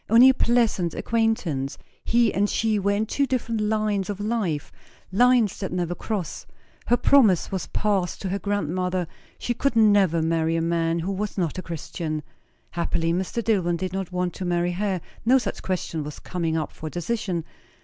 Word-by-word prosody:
Only 235 +4 +8
a - - +6
pleasant 230 -9 +1
acquain'tance. 220 - 0 0.3
He 235 -2 +3
and 205 +1 +1
she 220 -2 +1
were 200 +1 +1
in 210 +2 0
two 280 +5 0
different 230 -4 -1
lines 210 -2 0
of 205 -1 -3
life, 205 -9 -1 0.4
lines 240 0 +4
that 190 - -3
never 175 -1 -1
cross. 190 -3 -4 0.4
Her 240 - +4
promise 225 - +4
was 190 -2 -3
passed 195 -4 0
to 190 - -2
her 200 +2 -1
grandmother; 185 -2 -1 0.3
she 240 - -2
could 275 +1 0
never 200 -7 +4
marry 165 0 +1
a - - +1
man 165 0 +1
who 170 +4 -2
was 205 +2 -3
not 175 -1 -1
a - - -3
Christian. 160 -2 -4 0.5
Happily 170 -1 0
Mr. 190 +6 -2
Dillwyn 180 -6 +1
did 185 +1 -4
not 190 -2 -3
want 180 -1 -1
to 185 - -6
marry 175 0 +1
her; 190 0 -1 0.2
no 250 +4 +5
such 255 - -3
question 170 -4 -2
was 150 0 -7
coming 165 -3 -2
up 155 - -2
for 155 - -7
decision. 175 0 -2
190 Hz, 180 wpm, -24 LUFS, 170-220 Hz, 0.5 s, Only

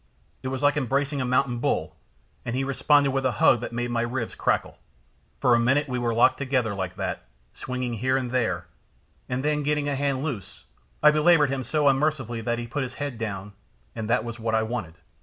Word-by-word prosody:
It - - -5
was 130 +1 -3
like 145 +1 +4
embracing 140 +1 0
a - - -1
mountain 125 -1 +1
bull, - - -1 0.5
and 120 - -3
he 135 - 0
responded 140 +1 +3
with 135 0 -1
a 130 -2 +1
hug 120 +3 +4
that - - -5
made 120 +1 -2
my 120 -1 0
ribs 120 0 -3
crackle. - - -1 0.6
For 125 - +4
a 120 - +5
minute 135 +5 +2
we 125 -1 -2
were 120 -1 0
locked 115 +1 +4
together 130 -6 0
like 95 -2 -4
that, - - -4 0.3
swinging 125 -2 -4
here 130 +4 +1
and 125 -2 -3
there, 95 -9 0 0.6
and 125 +2 -2
then 150 0 +1
getting 150 0 0
a 145 - 0
hand 140 -1 -1
loose, 125 - -6 0.4
I 150 - +8
belaboured 150 -2 +4
him 135 -1 -1
so 150 +4 +1
unmercifully 135 -4 +1
that 120 +1 -1
he 120 - -4
put 145 +5 -3
his 130 0 -4
head 140 -5 -4
down, 105 -2 -5 0.4
and 110 0 -4
that 115 -2 +2
was 120 0 -6
what 110 0 0
I 110 - +2
wanted. 110 -8 -4
125 Hz, 215 wpm, -25 LUFS, 120-140 Hz, 0.6 s, I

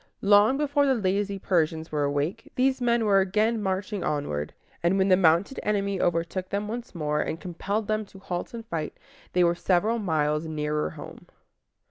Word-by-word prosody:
Long 205 +5 +5
before 285 -1 +2
the 265 - +3
lazy 200 -1 0
Persians 160 -4 0
were 150 -1 0
awake, 145 +4 -2
these 260 0 +2
men 235 -2 +2
were 200 -2 +5
again 215 +4 +1
marching 190 0 -2
onward; 75 - -2 0.3
and 175 +3 +2
when 190 0 +2
the 185 - +7
mounted 175 +6 +3
enemy 200 -2 0
overtook 175 +2 -1
them 205 +1 -2
once 235 -1 -6
more, 150 -2 0
and 160 - -3
compelled 200 +4 -3
them 215 0 0
to 195 - -15
halt 180 +3 -5
and 230 -1 -7
fight, 165 -7 -4 0.4
they 180 - +4
were 170 0 +4
several 195 +6 +1
miles 155 -4 0
nearer 150 -1 -1
home. - - -11
190 Hz, 175 wpm, -26 LUFS, 160-215 Hz, 0.4 s, the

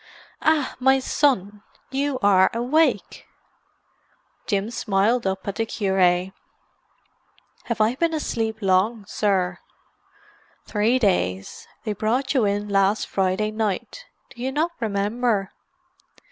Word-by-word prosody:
"Ah, 310 -3 +1
my 265 +1 +4
son! 210 -7 0 0.3
You 275 0 -1
are 190 -2 +5
awake!" 275 +8 0 1.2
Jim 205 -1 -1
smiled 220 0 +1
up 190 +1 -3
at 200 - -3
the 225 - 0
cure. 195 -3 -1 1.7
"Have 235 -2 -3
I 215 +2 +3
been 330 +5 0
asleep 225 -7 -3
long, 200 +3 +1
sir?" 185 -5 0 1.1
"Three 220 +4 +1
days. 95 - -1 0.2
They 215 - -2
brought 230 +6 -1
you 255 -6 +2
in 205 +1 -1
last 200 +1 +2
Friday 195 +3 0
night. 215 - -3 0.3
Do 240 -3 -12
you 260 +2 -1
not 315 +5 0
remember?" 210 -1 -1
215 Hz, 115 wpm, -23 LUFS, 195-250 Hz, 1.7 s, are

